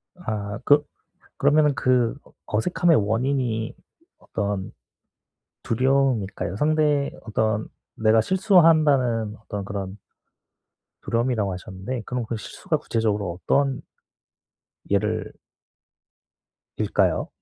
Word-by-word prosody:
아 105 - -4
그 145 +1 +5 0.5
그러면은 150 -1 +3
그 125 -2 +2
어 - - -21 0.3
어색함의 170 +5 +3
원인이 115 +1 0 0.4
어떤 100 -2 -3 0.9
두려움일까요? 125 -7 +1
상대의 150 0 +2
어떤 110 -1 -1 0.3
"내가 110 0 +4
실수한다는 155 - +3
어떤 105 -2 -6
그런" 100 -1 -5 1.0
"두려움"이라고 115 -4 0
하셨는데 95 +6 -6
그럼 125 -2 -3
그 115 - -3
실수가 - - -3
구체적으로 105 -5 -1
어떤 140 -1 +1 1.1
예를 - - 0 1.5
일까요? - - +1
115 Hz, 230 characters per minute, -24 LUFS, 105-140 Hz, 1.5 s, 그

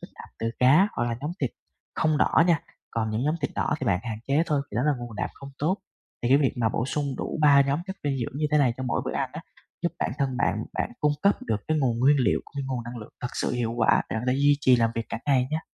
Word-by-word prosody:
chất - - -10
đạm - - -11
từ 115 - -1
cá 145 +11 +6
hoặc 120 - -1
là 120 -1 -2
nhóm 150 +3 -3
thịt 135 -5 0 0.4
không 155 -2 +1
đỏ - - +4
nha, 170 -4 +3 0.3
còn 110 -1 -1
những 110 +2 -1
nhóm 150 - +2
thịt - - -1
đỏ - - 0
thì - - -2
bạn 90 -2 +3
hạn 110 -3 -4
chế 145 +4 +3
thôi, 150 -3 +1
vì 100 - -5
đó 120 - +2
là 150 +1 +3
nguồn 120 -3 -8
đạm - - -1
không 140 0 -10
tốt. 170 +6 +1 0.5
Thì 120 - +1
cái 135 - +6
việc 140 -3 +2
mà 115 -2 +2
bổ 115 - -1
sung 145 +1 -1
đủ - - -4
3 145 -2 +7
nhóm 140 +3 0
chất 190 0 -5
dinh 140 -2 0
dưỡng 125 +3 -4
như 155 - +1
thế 150 - +4
này 130 -5 +3
cho 130 - -5
mỗi 125 -2 0
bữa - - -3
ăn - - -1
á, - - -6 0.4
giúp - - 0
bản - - -1
thân 135 -2 0
bạn 120 - 0
bạn - - -2
cung 150 0 +3
cấp 200 - +4
được 110 - 0
cái 155 -1 +2
nguồn 120 -4 +1
nguyên 140 +4 +5
liệu 125 - +2
của - - -19
cái 140 - -1
nguồn 125 -3 -3
năng 120 +1 -7
lượng 110 -1 -10
thật 125 - -3
sự - - -1
hiệu 120 -2 -1
quả 110 - +4
để - - -1
bạn 110 - -2
có 125 - +3
thể 130 - 0
duy 145 0 +4
trì 130 -3 +5
làm 115 -1 +2
việc 115 0 -3
cả 115 - -4
ngày 130 -3 +3
nha. 155 +1 -1
130 Hz, 305 wpm, -26 LUFS, 120-145 Hz, 0.5 s, 3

